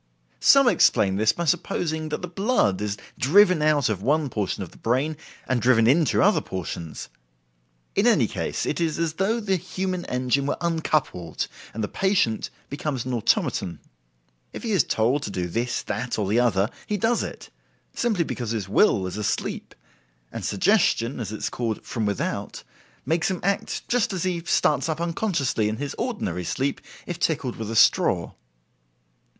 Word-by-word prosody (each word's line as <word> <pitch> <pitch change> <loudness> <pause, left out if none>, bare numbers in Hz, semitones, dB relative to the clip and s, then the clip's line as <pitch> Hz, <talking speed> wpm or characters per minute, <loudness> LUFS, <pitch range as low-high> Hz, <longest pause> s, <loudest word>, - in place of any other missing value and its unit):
Some 275 -2 +6
explain 95 - +4
this 110 +1 +4
by 170 - -4
supposing 160 -2 -1
that 155 - -4
the - - -2
blood 180 - +1
is 105 -1 -2 0.2
driven 185 +3 +5
out 150 -3 +3
of 105 -4 -2
one 145 +4 +1
portion 100 -2 -2
of 90 - -10
the - - -18
brain 135 +7 0 0.3
and 130 -2 +1
driven 120 -3 +4
into 145 +3 +3
other - - +4
portions. 85 -3 -6 0.9
In - - +2
any - - +4
case, - - -3
it - - -2
is 160 -2 0
as 165 -2 -1
though 195 +7 0
the 195 -4 0
human 185 +1 -3
engine 130 +2 0
were - - -1
uncoupled, 155 - -1 0.2
and 110 - -4
the - - 0
patient 190 - +1 0.2
becomes 140 -3 -3
an 130 - -3
automaton. 95 -6 0 0.8
If - - -7
he 230 - -2
is 195 - +4
told 120 +6 +1
to 135 - -4
do 90 -3 -2
this, 120 +7 -2
that, 120 +5 -3
or 105 -3 -1
the 110 +4 +2
other, 110 -2 +2 0.2
he 210 - -1
does 225 +4 +1
it, - - -7 0.4
simply 220 -8 +1
because 120 -7 -4
his 110 -4 -2
will 95 -1 +3
is 90 - -5
asleep 105 -2 -3 0.6
and - - -6
"suggestion", 130 - +2
as 110 -3 -4
it 110 - -4
is - - -2
called, 115 -3 -3
from 110 -4 -2
without 100 - -3 0.4
makes 165 +2 +1
him 185 -2 -2
act 200 +1 -1
just 235 -3 +1
as 185 - -2
he 180 -2 -1
starts 150 +2 +2
up 160 0 -2
unconsciously 165 - 0
in 110 - -3
his 145 0 -4
ordinary 230 - -2
sleep 135 +10 -2 0.2
if 175 -1 -5
tickled 150 -8 -1
with 110 -1 -5
a 115 - -3
straw. - - +4
140 Hz, 175 wpm, -24 LUFS, 110-175 Hz, 0.9 s, Some